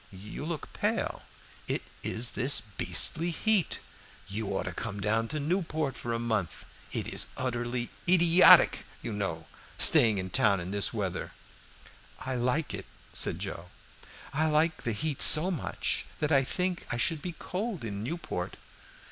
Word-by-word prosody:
You 100 +9 -9
look 165 -2 -6
pale. - - -2 0.5
It - - -2 0.2
is 115 +1 -1
this 130 +5 +4
beastly 155 +10 +4
heat 200 +1 +1 0.5
you 105 +2 -4
ought 95 - -2
to - - -6
come 100 - -6
down 110 +3 0
to 155 +4 -4
Newport 155 -3 -2
for 120 - -5
a 115 - -1
month. 110 -6 -3 0.3
It - - -2
is - - -4
utterly 120 -1 -3 0.2
idiotic, 175 0 +7 0.2
you 115 - -4
know, 90 -6 -4 0.3
staying 110 -3 +5
in 95 -1 -5
town 100 -3 +3
in 90 +2 -6
this 100 0 0
weather." 100 -5 -4 0.8
"I 130 - -5
like 125 +4 -1
it," 100 -1 -7 0.3
said - - 0
Joe. 90 +2 -6 0.6
"I 155 +3 +1
like 155 +2 +1
the 120 - -2
heat 150 +4 -2
so 165 +5 +8
much 165 - -3
that 150 0 -1
I 135 -2 +4
think 180 +5 -3
I 120 - -2
should 150 +5 0
be 175 +1 -5
cold 195 - -5
in 100 -2 -5
Newport. 130 - -5
125 Hz, 155 wpm, -28 LUFS, 105-160 Hz, 0.8 s, so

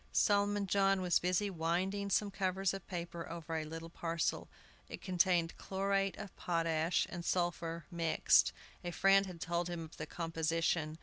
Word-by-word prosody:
Solomon 205 -1 +2
John 195 0 +3
was 180 -1 +3
busy 185 +3 +1
winding 185 +4 -1
some 200 +1 +1
covers 190 -1 0
of 195 -2 -7
paper 170 -2 -5
over 165 -1 -5
a 155 -1 -2
little 165 +1 -7
parcel. 165 -1 -2 0.4
It - - -6
contained 180 -3 +2
chlorate 195 0 0
of 200 - -8
potash 165 -1 +1
and 175 -1 -5
sulphur 170 -2 -1
mixed. 165 -2 +4 0.3
A 175 - -3
friend 195 +2 +4
had 180 -2 -8
told 170 +1 -1
him 170 -1 -4
of 160 - -12
the 155 - -5
composition. 165 -1 -1
175 Hz, 160 wpm, -35 LUFS, 165-195 Hz, 0.4 s, mixed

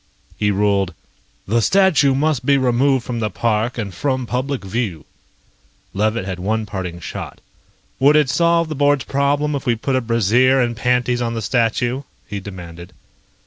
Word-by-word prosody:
He 105 - 0
ruled: 100 -3 +1 0.5
"The 115 +4 +1
statue 160 - +3
must 145 -3 0
be 140 +2 +3
removed 130 0 +2
from 120 -2 -3
the 110 -2 -1
park 110 +4 -1
and 100 -5 -4
from 130 +5 -1
public 130 0 -3
view." 95 -6 -3 0.9
Levitt 110 +1 0
had 95 -2 -5
one 110 +4 -1
parting 90 -4 -5
shot. - - -7 0.6
"Would 140 +3 +5
it 150 -2 +4
solve 170 +5 +2
the 155 - -5
board's 145 -1 +2
problem 145 +2 0
if 140 -1 -4
we 120 - +3
put 130 +4 -2
a 130 - +1
brassiere 120 +3 +3
and 120 -2 0
panties 125 0 0
on 115 -1 -2
the 115 - -3
statue?" 120 +3 0 0.3
he 100 - -4
demanded. 90 -2 -10
120 Hz, 165 wpm, -19 LUFS, 105-135 Hz, 0.9 s, Would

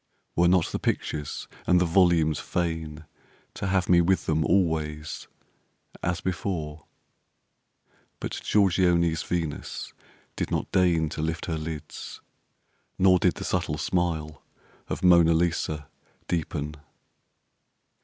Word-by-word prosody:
Were 85 +1 +4
not 90 -1 +4
the - - -2
pictures 75 -2 -2 0.2
and 90 - +5
the 90 - +3
volumes 85 -3 +3
fain 80 -3 -3 0.5
To 100 - -4
have 95 -2 +1
me 90 -1 +6
with 95 +2 +2
them 80 0 +1
always 80 -4 0 0.7
as 85 0 -1
before? 80 -5 -3 1.3
But - - -4
Giorgione's 90 -4 +3
Venus 85 -4 -4 0.4
did - - -2
not - - -2
deign 85 -4 +3
To 75 - -5
lift 80 +1 -2
her 80 -2 -2
lids, 75 -1 -7 0.8
nor 95 -1 +5
did - - +2
the - - -6
subtle 75 - -1
smile 80 -2 -1 0.5
Of - - -4
Mona 85 -2 +6
Lisa 80 -3 0 0.4
deepen. 75 -2 -2
85 Hz, 115 wpm, -26 LUFS, 75-90 Hz, 1.3 s, me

